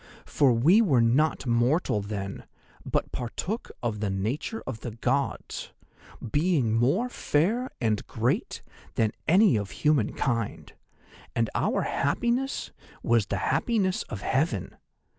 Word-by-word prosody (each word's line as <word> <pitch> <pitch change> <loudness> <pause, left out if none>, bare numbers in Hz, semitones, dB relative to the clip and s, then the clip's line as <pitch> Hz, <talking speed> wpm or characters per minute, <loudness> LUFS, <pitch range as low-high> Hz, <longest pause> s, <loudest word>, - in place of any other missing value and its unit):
For 140 -4 +3
we 155 - +5
were 150 - +3
not 135 +7 +2
mortal 120 - +2
then, 100 -1 -5 0.4
but - - -1
partook 175 - -4
of 110 -3 -1
the 105 -1 -1
nature 115 - -3
of 125 -4 -5
the 120 - -5
Gods, 125 +5 -2 0.6
being 145 -8 +2
more 140 - +2
fair 230 - 0
and 110 -4 0
great - - -1 0.3
than 110 -2 +2 0.2
any 185 - +5
of 100 -2 -3
human 150 -8 +1
kind, 115 -5 -2 0.6
and 115 -1 +1
our - - +1
happiness 240 - -1 0.3
was 115 -3 +2
the 100 - -1 0.2
happiness 200 -6 +1
of 105 -4 -5
Heaven. 130 - -1
130 Hz, 125 wpm, -27 LUFS, 110-175 Hz, 0.6 s, we